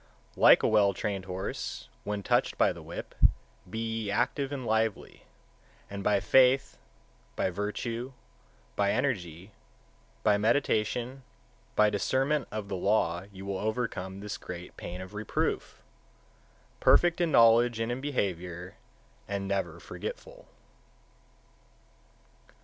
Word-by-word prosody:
144. -, -, -11 dB
Like -, -, +8 dB
a -, -, +4 dB
well 105 Hz, -2 st, +4 dB
trained 100 Hz, -3 st, -3 dB
horse 95 Hz, -8 st, -5 dB, 0.2 s
when 105 Hz, -1 st, -3 dB
touched -, -, +1 dB
by -, -, +3 dB
the -, -, -11 dB
whip, -, -, -8 dB, 0.6 s
be 110 Hz, -, -6 dB, 0.3 s
ye -, -, -3 dB
active 135 Hz, +7 st, 0 dB
and 135 Hz, -3 st, -4 dB
lively, 110 Hz, -1 st, -1 dB, 0.6 s
and 100 Hz, -1 st, -5 dB
by 105 Hz, 0 st, +3 dB
faith, 130 Hz, +4 st, +4 dB, 0.6 s
by 95 Hz, -, 0 dB
virtue, 115 Hz, +6 st, -3 dB, 0.6 s
by 100 Hz, 0 st, +2 dB
energy, 95 Hz, -, -2 dB, 0.7 s
by 105 Hz, -1 st, +4 dB
meditation, 120 Hz, +2 st, +1 dB, 0.5 s
by 105 Hz, 0 st, +5 dB
discernment 135 Hz, +7 st, +1 dB
of 105 Hz, -1 st, -4 dB
the 100 Hz, -, -3 dB
law 95 Hz, -2 st, +1 dB
you 95 Hz, 0 st, -10 dB
will 100 Hz, -1 st, -3 dB
overcome 105 Hz, -4 st, -3 dB
this 105 Hz, 0 st, -5 dB
great 90 Hz, 0 st, -8 dB
pain 90 Hz, +1 st, -7 dB
(of 95 Hz, +2 st, -9 dB
reproof), 105 Hz, 0 st, -2 dB, 1.0 s
perfect 175 Hz, 0 st, +4 dB
in 170 Hz, -, +2 dB
knowledge 115 Hz, -1 st, +5 dB
and 115 Hz, +1 st, -1 dB
in 125 Hz, +2 st, -3 dB
behaviour, 90 Hz, -, -3 dB, 0.5 s
and 100 Hz, -1 st, -3 dB
never 90 Hz, -4 st, -2 dB
forgetful. -, -, -8 dB
105 Hz, 125 wpm, -29 LUFS, 95-120 Hz, 1.0 s, Like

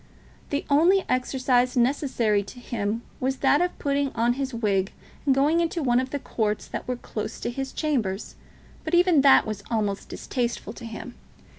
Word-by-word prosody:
The 285 Hz, -, -2 dB
only 340 Hz, +7 st, +4 dB
exercise 255 Hz, -1 st, +1 dB
necessary 240 Hz, -5 st, +2 dB
to 200 Hz, +5 st, -11 dB
him 225 Hz, -2 st, -3 dB, 0.2 s
was 265 Hz, +1 st, 0 dB
that 285 Hz, -, +3 dB
of 355 Hz, 0 st, -1 dB
putting 280 Hz, 0 st, 0 dB
on 235 Hz, +1 st, +2 dB
his 265 Hz, +1 st, -3 dB
wig 205 Hz, -5 st, 0 dB, 0.4 s
and 270 Hz, -, +5 dB
going 295 Hz, +5 st, +3 dB
into 335 Hz, -1 st, 0 dB
one 245 Hz, -2 st, +3 dB
of 260 Hz, +1 st, -2 dB
the 285 Hz, -, -2 dB
courts 215 Hz, -6 st, -2 dB
that -, -, -6 dB
were 250 Hz, -, -1 dB
close 220 Hz, -3 st, -6 dB
to -, -, -2 dB
his 270 Hz, +2 st, -4 dB
chambers; 230 Hz, -11 st, -2 dB, 0.5 s
but -, -, 0 dB
even 350 Hz, -4 st, +5 dB
that 270 Hz, -1 st, +6 dB
was 215 Hz, -2 st, -4 dB
almost 210 Hz, -3 st, -1 dB
distasteful 235 Hz, -4 st, -3 dB
to 235 Hz, -, -10 dB
him. 230 Hz, +2 st, -7 dB
250 Hz, 175 wpm, -25 LUFS, 225-280 Hz, 0.5 s, that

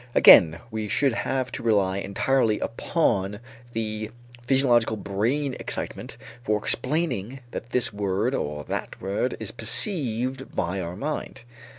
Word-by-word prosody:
Again 85 Hz, -4 st, +8 dB
we 110 Hz, -1 st, -3 dB
should 135 Hz, +7 st, +2 dB
have 130 Hz, +1 st, -2 dB
to -, -, -5 dB
rely 100 Hz, -4 st, +2 dB
entirely 110 Hz, +3 st, +1 dB
upon 105 Hz, -, 0 dB, 0.3 s
the 110 Hz, -1 st, -3 dB, 0.3 s
physiological 120 Hz, -3 st, +3 dB
brain 120 Hz, +8 st, -1 dB
excitement -, -, -5 dB, 0.3 s
for 105 Hz, -1 st, +1 dB
explaining 130 Hz, -, -2 dB
that 115 Hz, -, -6 dB
this 125 Hz, -2 st, 0 dB
word 100 Hz, +4 st, 0 dB
or 75 Hz, -, -3 dB
that -, -, -5 dB
word 100 Hz, +6 st, -2 dB
is 110 Hz, -3 st, -5 dB
perceived 130 Hz, -, 0 dB
by 90 Hz, +3 st, -1 dB
our 85 Hz, 0 st, -5 dB
mind. 145 Hz, 0 st, -4 dB
115 Hz, 125 wpm, -25 LUFS, 100-130 Hz, 0.3 s, Again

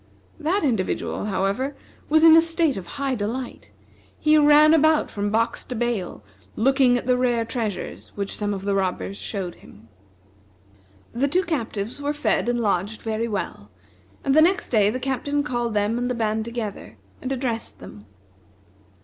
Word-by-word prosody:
That 330 Hz, +5 st, 0 dB
individual, 225 Hz, -6 st, -1 dB
however, 210 Hz, +8 st, -1 dB, 0.3 s
was 315 Hz, +1 st, +4 dB
in 325 Hz, -1 st, +9 dB
a 325 Hz, -, +8 dB
state 330 Hz, -3 st, +1 dB
of 185 Hz, -3 st, -7 dB
high 275 Hz, -1 st, -1 dB
delight. 240 Hz, +3 st, -4 dB, 0.5 s
He 305 Hz, 0 st, +3 dB
ran 300 Hz, +1 st, +6 dB
about 315 Hz, 0 st, +3 dB
from 205 Hz, 0 st, -2 dB
box 225 Hz, +2 st, 0 dB
to 250 Hz, -, -6 dB
bale, 235 Hz, -6 st, -2 dB, 0.3 s
looking 260 Hz, +1 st, +3 dB
at 245 Hz, -, -5 dB
the 250 Hz, 0 st, +3 dB
rare 240 Hz, -2 st, +1 dB
treasures 220 Hz, -5 st, -5 dB
which 200 Hz, -1 st, -3 dB
some 205 Hz, -1 st, -2 dB
of 195 Hz, -1 st, -4 dB
the 200 Hz, 0 st, 0 dB
robbers 195 Hz, 0 st, -1 dB
showed 190 Hz, -5 st, -4 dB
him. 110 Hz, +3 st, -17 dB, 1.2 s
The 260 Hz, +4 st, +1 dB
two 360 Hz, +6 st, +1 dB
captives 235 Hz, -, -3 dB
were 290 Hz, +1 st, -1 dB
fed 295 Hz, -4 st, 0 dB
and 240 Hz, 0 st, 0 dB
lodged 205 Hz, 0 st, -1 dB
very 225 Hz, +1 st, -2 dB
well; 185 Hz, -, -5 dB, 0.5 s
and 270 Hz, -, +2 dB
the 310 Hz, -, +6 dB
next 375 Hz, +6 st, +2 dB
day 210 Hz, -4 st, +4 dB
the 250 Hz, +4 st, -3 dB
Captain 270 Hz, +2 st, -1 dB
called 240 Hz, -5 st, -2 dB
them 210 Hz, +3 st, +1 dB
and 245 Hz, 0 st, -1 dB
the 250 Hz, -, -1 dB
band 220 Hz, -1 st, -1 dB
together, 215 Hz, -, -6 dB, 0.2 s
and 260 Hz, -, -4 dB
addressed 245 Hz, -4 st, -3 dB
them. 105 Hz, 0 st, -12 dB
240 Hz, 165 wpm, -23 LUFS, 205-280 Hz, 1.2 s, in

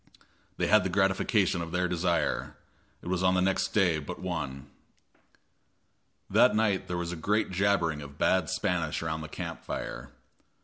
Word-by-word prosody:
They -, -, +1 dB
had 105 Hz, -2 st, +5 dB
the 95 Hz, -, -1 dB
gratification 95 Hz, 0 st, +2 dB
of 85 Hz, 0 st, -5 dB
their 90 Hz, +1 st, +1 dB
desire; 85 Hz, -1 st, -1 dB, 0.5 s
it -, -, -9 dB
was 90 Hz, 0 st, 0 dB
on 95 Hz, 0 st, +3 dB
the -, -, +3 dB
next 95 Hz, 0 st, +1 dB
day 90 Hz, -7 st, +2 dB
but 70 Hz, -, -7 dB
one. 75 Hz, -7 st, -4 dB, 1.6 s
That -, -, +4 dB
night 105 Hz, -3 st, +1 dB
there 90 Hz, -, -2 dB
was 85 Hz, 0 st, -3 dB
a -, -, -4 dB
great 100 Hz, +5 st, 0 dB
jabbering 95 Hz, -5 st, +1 dB
of 70 Hz, 0 st, -11 dB
bad 95 Hz, -1 st, +2 dB
Spanish 85 Hz, -3 st, -1 dB
around 80 Hz, -1 st, -2 dB
the 80 Hz, -, -6 dB
camp -, -, -6 dB
fire. -, -, -6 dB
90 Hz, 165 wpm, -29 LUFS, 80-95 Hz, 1.6 s, had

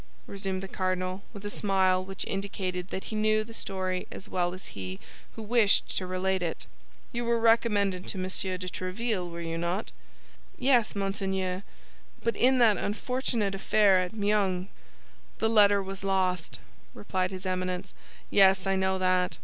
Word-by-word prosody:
resumed 195 Hz, -1 st, -3 dB
the -, -, -4 dB
cardinal, 185 Hz, 0 st, -2 dB
with 205 Hz, -2 st, -10 dB
a -, -, -2 dB
smile 190 Hz, -3 st, +2 dB
which 195 Hz, +1 st, -6 dB
indicated 185 Hz, -2 st, -3 dB
that 190 Hz, -, -5 dB
he 220 Hz, -, -6 dB
knew 215 Hz, 0 st, +2 dB
the 225 Hz, +1 st, -11 dB
story 185 Hz, -3 st, -3 dB
as 195 Hz, -, -8 dB
well 175 Hz, -3 st, 0 dB
as 185 Hz, -, -8 dB
he 95 Hz, -1 st, -6 dB, 0.4 s
who 225 Hz, -, -6 dB
wished 215 Hz, -2 st, +3 dB
to 185 Hz, -, -2 dB
relate 185 Hz, +1 st, 0 dB
it. 170 Hz, -2 st, -3 dB, 0.5 s
"You 240 Hz, 0 st, -2 dB
were 235 Hz, 0 st, +1 dB
recommended 210 Hz, -5 st, +2 dB
to -, -, -4 dB
Monsieur 185 Hz, 0 st, -1 dB
de 180 Hz, 0 st, -6 dB
Tréville, 185 Hz, +1 st, -2 dB
were 170 Hz, 0 st, -6 dB
you 165 Hz, 0 st, -3 dB
not?" 175 Hz, +5 st, -2 dB, 0.7 s
"Yes, 245 Hz, -5 st, +3 dB
monseigneur; 190 Hz, -2 st, -1 dB, 0.6 s
but 230 Hz, -, +1 dB
in 260 Hz, +1 st, +4 dB
that 225 Hz, -4 st, +5 dB
unfortunate 225 Hz, -1 st, -1 dB
affair 195 Hz, 0 st, +4 dB
at 180 Hz, -1 st, -2 dB
Meung—" 200 Hz, -3 st, +1 dB, 0.7 s
"The 220 Hz, -, +1 dB
letter 205 Hz, -2 st, +5 dB
was 195 Hz, 0 st, -7 dB
lost," 185 Hz, -3 st, 0 dB, 0.4 s
replied 185 Hz, -, -1 dB
his 190 Hz, 0 st, -7 dB
Eminence; 185 Hz, -, -2 dB, 0.4 s
"yes, 190 Hz, -1 st, +5 dB
I 195 Hz, 0 st, +2 dB
know 190 Hz, 0 st, +1 dB
that. 185 Hz, -1 st, +1 dB
190 Hz, 160 wpm, -28 LUFS, 185-210 Hz, 0.7 s, that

